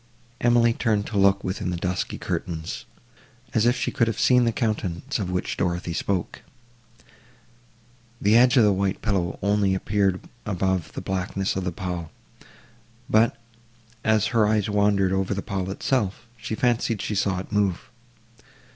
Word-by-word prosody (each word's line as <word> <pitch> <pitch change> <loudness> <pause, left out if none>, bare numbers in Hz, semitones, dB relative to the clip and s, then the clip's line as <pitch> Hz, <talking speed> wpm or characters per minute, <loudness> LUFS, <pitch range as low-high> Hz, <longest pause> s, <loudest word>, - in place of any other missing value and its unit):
Emily 120 -1 +4
turned 110 -4 0
to 105 - -4
look 100 0 +4
within 95 -1 -3
the 90 - -2
dusky 90 +1 -2
curtains, 80 -2 -4 0.7
as 115 +1 +3
if 120 - +3
she - - -2
could 115 - +1
have 115 - -2
seen 125 -1 +4
the 115 - +2
countenance 110 +1 -2
of 95 -4 -2
which 90 0 -2
Dorothée 85 -1 -1
spoke. 95 -3 -2 1.8
The 105 +2 +3
edge 125 +3 +6
of 120 - +7
the 105 -1 +4
white 95 +1 -1
pillow 95 -6 0
only 100 -1 +2
appeared 95 -1 0 0.2
above 95 -5 -1
the - - -5
blackness 95 +1 -2
of 95 -1 -2
the 90 - -1
pall, 90 -2 -5 1.0
but, 110 +2 +3 0.6
as 110 -2 +3
her 110 -3 +4
eyes 105 -2 +1
wandered 100 -2 +2
over 95 +1 0
the 100 - -4
pall 95 -1 -3
itself, 105 +1 -1
she 110 -1 -5
fancied 115 -2 +1
she 105 - -3
saw 100 -2 0
it 95 - -7
move. 100 -4 0
100 Hz, 155 wpm, -24 LUFS, 95-110 Hz, 1.8 s, of